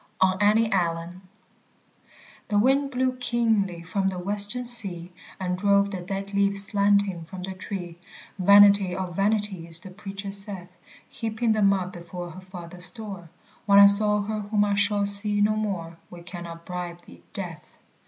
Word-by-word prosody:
ON 190 Hz, +1 st, +1 dB
ANNE 215 Hz, +2 st, +2 dB
ALLEN. 170 Hz, 0 st, -2 dB, 1.3 s
The 205 Hz, -, -1 dB
wind 270 Hz, +6 st, +2 dB
blew 255 Hz, -1 st, -1 dB
keenly 225 Hz, -8 st, -1 dB
from 190 Hz, +3 st, -2 dB
the 190 Hz, -1 st, -3 dB
Western 205 Hz, +6 st, +4 dB
sea, 190 Hz, -7 st, +2 dB, 0.3 s
And 180 Hz, -1 st, -2 dB
drove 200 Hz, +1 st, +1 dB
the 190 Hz, -3 st, -6 dB
dead 195 Hz, +2 st, -6 dB
leaves 200 Hz, 0 st, +3 dB
slanting 200 Hz, -4 st, 0 dB
from 180 Hz, +2 st, -10 dB
the 190 Hz, +1 st, -6 dB
tree 180 Hz, -2 st, -8 dB, 0.4 s
Vanity 200 Hz, -1 st, +5 dB
of 185 Hz, -2 st, -5 dB
vanities, 195 Hz, -5 st, 0 dB
the 185 Hz, +2 st, -11 dB
Preacher 195 Hz, +1 st, -8 dB
saith 195 Hz, -3 st, -5 dB, 0.4 s
Heaping 225 Hz, 0 st, -3 dB
them 210 Hz, -2 st, +3 dB
up 185 Hz, -1 st, -3 dB
before 175 Hz, 0 st, -9 dB
her 185 Hz, -, -12 dB
Father's 180 Hz, -1 st, -1 dB
door 195 Hz, -6 st, -9 dB, 0.4 s
When 200 Hz, 0 st, +5 dB
I 200 Hz, -, +9 dB
saw 210 Hz, +1 st, +4 dB
her 215 Hz, +1 st, -4 dB
whom 205 Hz, 0 st, 0 dB
I 205 Hz, -, -1 dB
shall 205 Hz, 0 st, 0 dB
see 205 Hz, +1 st, +2 dB
no 210 Hz, +1 st, +2 dB
more 180 Hz, -6 st, -4 dB
We 175 Hz, -1 st, -12 dB
cannot 170 Hz, -2 st, -10 dB
bribe 175 Hz, -1 st, -7 dB
thee, 85 Hz, -, -16 dB
Death. -, -, -8 dB
200 Hz, 160 wpm, -24 LUFS, 180-205 Hz, 1.3 s, I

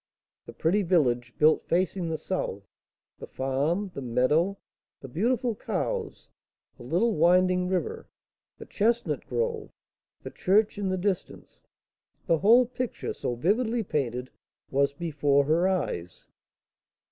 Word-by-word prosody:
The -, -, -9 dB
pretty 185 Hz, +6 st, +1 dB
village, 125 Hz, -10 st, +1 dB
built 155 Hz, +1 st, +3 dB
facing 180 Hz, 0 st, 0 dB
the 160 Hz, -, -2 dB
south, 125 Hz, -, -4 dB, 0.6 s
the -, -, -8 dB
farm, 150 Hz, +9 st, -1 dB
the 140 Hz, -, -6 dB
meadow, 140 Hz, +10 st, +1 dB, 0.4 s
the 135 Hz, -, -9 dB
beautiful 230 Hz, -, 0 dB
cows, 470 Hz, -, -4 dB, 0.5 s
the -, -, -16 dB
little 230 Hz, -1 st, +1 dB
winding 180 Hz, +2 st, +3 dB
river, 445 Hz, -, -2 dB, 0.5 s
the -, -, -10 dB
chestnut 235 Hz, +3 st, 0 dB
grove, 465 Hz, -2 st, -2 dB, 0.5 s
the -, -, -7 dB
church 205 Hz, +2 st, +2 dB
in 195 Hz, -2 st, -1 dB
the 185 Hz, -, 0 dB
distance, 185 Hz, 0 st, -4 dB, 0.6 s
the 165 Hz, -, +2 dB
whole 235 Hz, +7 st, +6 dB
picture, 250 Hz, 0 st, -4 dB
so 120 Hz, -, -3 dB
vividly 220 Hz, -, +1 dB
painted, 125 Hz, -, -3 dB, 0.4 s
was 140 Hz, +1 st, +2 dB
before 140 Hz, -2 st, +1 dB
her 165 Hz, +5 st, +2 dB
eyes. 90 Hz, -, -3 dB
180 Hz, 125 wpm, -27 LUFS, 140-210 Hz, 0.6 s, whole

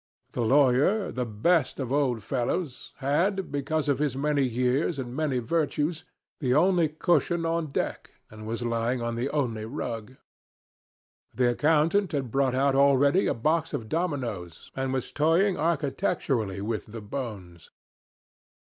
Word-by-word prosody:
The -, -, -3 dB
Lawyer 140 Hz, -, +3 dB
the 125 Hz, -1 st, -3 dB
best 135 Hz, +10 st, +1 dB
of 130 Hz, -1 st, -2 dB
old 130 Hz, -7 st, +1 dB
fellows 135 Hz, -, -3 dB
had, 180 Hz, +8 st, 0 dB
because 145 Hz, +2 st, -1 dB
of 140 Hz, -2 st, +1 dB
his 145 Hz, -3 st, 0 dB
many 145 Hz, 0 st, +1 dB
years 125 Hz, +5 st, +1 dB
and 125 Hz, -2 st, -5 dB
many 150 Hz, -3 st, 0 dB
virtues, 150 Hz, +4 st, -1 dB, 0.3 s
the 130 Hz, -3 st, +1 dB
only 175 Hz, +1 st, +4 dB
cushion 170 Hz, +1 st, +1 dB
on 165 Hz, -1 st, 0 dB
deck, 140 Hz, -, -3 dB, 0.2 s
and 110 Hz, 0 st, -9 dB
was 115 Hz, +2 st, -3 dB
lying 120 Hz, +1 st, 0 dB
on 115 Hz, 0 st, -2 dB
the 120 Hz, +4 st, -2 dB
only 120 Hz, -8 st, -1 dB
rug. 115 Hz, -1 st, -5 dB, 1.2 s
The 125 Hz, -1 st, +3 dB
Accountant 160 Hz, +8 st, +2 dB
had 135 Hz, -5 st, -2 dB
brought 135 Hz, -1 st, +1 dB
out 135 Hz, +1 st, +2 dB
already 140 Hz, +5 st, +4 dB
a -, -, 0 dB
box 160 Hz, +7 st, 0 dB
of 110 Hz, -2 st, -6 dB
dominoes, 125 Hz, -, -3 dB
and 135 Hz, 0 st, -2 dB
was 130 Hz, -2 st, -2 dB
toying 165 Hz, +6 st, +3 dB
architecturally 140 Hz, -, -1 dB
with 110 Hz, +1 st, -3 dB
the 110 Hz, +1 st, -8 dB
bones. 100 Hz, -7 st, -7 dB
135 Hz, 145 wpm, -27 LUFS, 120-155 Hz, 1.2 s, only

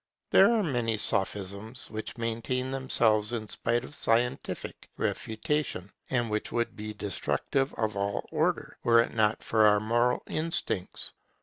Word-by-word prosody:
There 195 Hz, +4 st, +7 dB
are 225 Hz, -3 st, +2 dB
many 120 Hz, -, 0 dB
sophisms 100 Hz, +4 st, -1 dB
which 110 Hz, +2 st, -5 dB
maintain 115 Hz, +3 st, -2 dB
themselves 120 Hz, -5 st, +2 dB
in 110 Hz, -2 st, -3 dB
spite 115 Hz, +3 st, -1 dB
of -, -, -11 dB
scientific 120 Hz, -3 st, -1 dB
refutation, 110 Hz, -4 st, -2 dB, 0.2 s
and 120 Hz, -2 st, +1 dB
which 105 Hz, -1 st, -2 dB
would 120 Hz, 0 st, -1 dB
be 110 Hz, 0 st, -5 dB
destructive 135 Hz, +7 st, -1 dB
of 110 Hz, -2 st, -1 dB
all 100 Hz, 0 st, -2 dB
order, -, -, -1 dB
were 115 Hz, 0 st, +6 dB
it 115 Hz, -, +1 dB
not 110 Hz, -1 st, +1 dB
for 110 Hz, -1 st, +4 dB
our 105 Hz, 0 st, +5 dB
moral 120 Hz, +3 st, +1 dB
instincts. 155 Hz, -, -3 dB
115 Hz, 140 wpm, -29 LUFS, 105-125 Hz, 0.2 s, There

